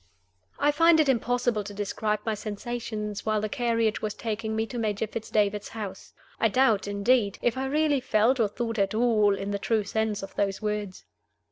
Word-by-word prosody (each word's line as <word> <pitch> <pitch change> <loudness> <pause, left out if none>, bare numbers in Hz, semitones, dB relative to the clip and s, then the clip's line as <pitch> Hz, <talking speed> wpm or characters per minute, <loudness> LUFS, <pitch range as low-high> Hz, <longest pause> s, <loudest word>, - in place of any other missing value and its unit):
I 290 +1 +3
FIND 330 +2 +5
it 310 - +4
impossible 245 -3 +1
to 205 0 -8
describe 210 +1 -1
my 220 - 0
sensations 215 0 -5
while 215 -1 +1
the 215 - -1
carriage 230 -3 0
was 215 -1 -3
taking 220 -1 -3
me 220 0 0
to 240 +1 -6
Major 215 -1 -1
Fitz 220 +1 -6
David's 210 -1 +1
house. 205 -4 -7 0.2
I 225 - +4
doubt, 225 -4 +2
indeed, 205 +1 +2
if 240 0 +2
I 265 +1 -2
really 295 0 +2
felt 245 +1 +2
or 225 - +4
thought 230 +1 -3
at 195 +1 +1
all, 215 -4 +3
in 195 +1 -4
the 200 - -2
true 220 +1 +1
sense 215 0 -1
of 195 - -8
those 195 -1 -1
words. 210 -3 -4
220 Hz, 195 wpm, -27 LUFS, 205-240 Hz, 0.2 s, FIND